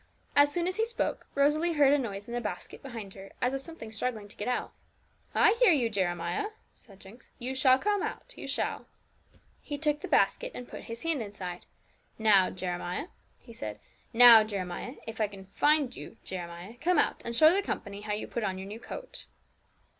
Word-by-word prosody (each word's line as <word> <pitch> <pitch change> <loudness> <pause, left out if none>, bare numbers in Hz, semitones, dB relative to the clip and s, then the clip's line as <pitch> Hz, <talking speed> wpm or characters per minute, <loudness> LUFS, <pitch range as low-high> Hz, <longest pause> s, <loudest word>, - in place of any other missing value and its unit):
As 285 0 +6
soon 345 +1 0
as 370 +2 -1
he 445 - +2
spoke, 470 - -2
Rosalie 300 +4 +3
heard 285 -2 +5
a - - +5
noise 205 -5 -5
in 235 - -7
a 240 - -1
basket 195 -5 -6
behind 225 -7 -8
her 195 0 -12
as 250 +1 +1
of 270 - -1
something 275 -8 -8
struggling 220 -2 -3
to - - -10
get 210 - -5
out. 250 - -2 0.6
'I 450 -1 +5
hear - - +7
you, 245 -8 +2
Jeremiah,' 175 - -1 0.2
said 195 -4 -18
Jinx; 205 +6 -15
'you 255 +1 -4
shall 260 -1 +5
come, 410 +6 0 0.3
you - - -8
shall.' - - -1 0.7
He 290 - -5
took 300 0 0
the - - -5
basket, - - +2
and 245 - -7
put - - -9
his 230 0 -7
hand 325 -5 0
inside. 190 -4 -7 0.5
'Now, 205 -4 +5
Jeremiah,' 180 - -4 0.3
he 235 - -14
said 105 - -6 0.3
'now, 235 -2 +10
Jeremiah, 200 +4 -5
if 225 0 -5
I 215 - +3
can 195 -1 -12
find 290 +5 +2
you, 225 - -10
Jeremiah, 175 +4 -7
come 360 +2 +2
out, - - +1
and 235 - -3
show 310 +6 +7
the 395 - +2
company 200 - -5
how 210 0 -3
you 210 - -3
put 235 - -3
on 190 -2 -1
your 190 +1 -7
new 210 +3 -7
coat.' - - -8
235 Hz, 200 wpm, -29 LUFS, 200-290 Hz, 0.7 s, now